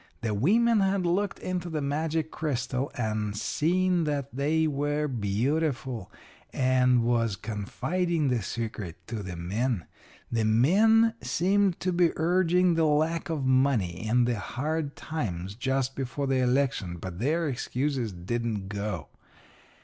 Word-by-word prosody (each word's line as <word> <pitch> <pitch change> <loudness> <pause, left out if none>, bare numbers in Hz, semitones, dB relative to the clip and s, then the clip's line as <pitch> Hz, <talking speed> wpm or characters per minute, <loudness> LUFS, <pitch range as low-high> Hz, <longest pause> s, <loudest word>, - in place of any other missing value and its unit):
The 115 -2 -1
women 220 - +3
had 195 -1 +1
looked 195 +4 0
into 180 -1 -3
the 160 -2 -2
magic 155 +3 -1
crystal 130 -2 -2
and 105 -3 -2
seen 175 - +1
that 140 -3 -3
they 155 +4 +2
were 145 0 0
beautiful, 125 - -1 0.4
and 125 -2 +3
was 115 -3 +1
confiding 150 - -1
the 125 -3 +1
secret 105 -5 -4
to 115 -3 -5
the 90 -3 -6
men. 100 +4 -1 0.5
The 115 -1 +1
men 205 - +4
seemed 195 +1 +1
to 185 - 0
be 175 -1 +4
urging 180 +1 +3
the 165 -1 +2
lack 160 +3 +1
of 150 -5 -1
money 125 -8 +1
and 120 +1 +3
the 120 -3 0
hard 145 +6 -3
times 95 - -4
just 130 +3 -1
before 135 +1 -3
the 135 -1 +1
election, 125 -8 +1
but 90 0 -7
their 160 +7 +1
excuses 130 -2 -2
didn't 100 +2 -3
go. 100 -6 -4
135 Hz, 135 wpm, -28 LUFS, 110-160 Hz, 0.5 s, men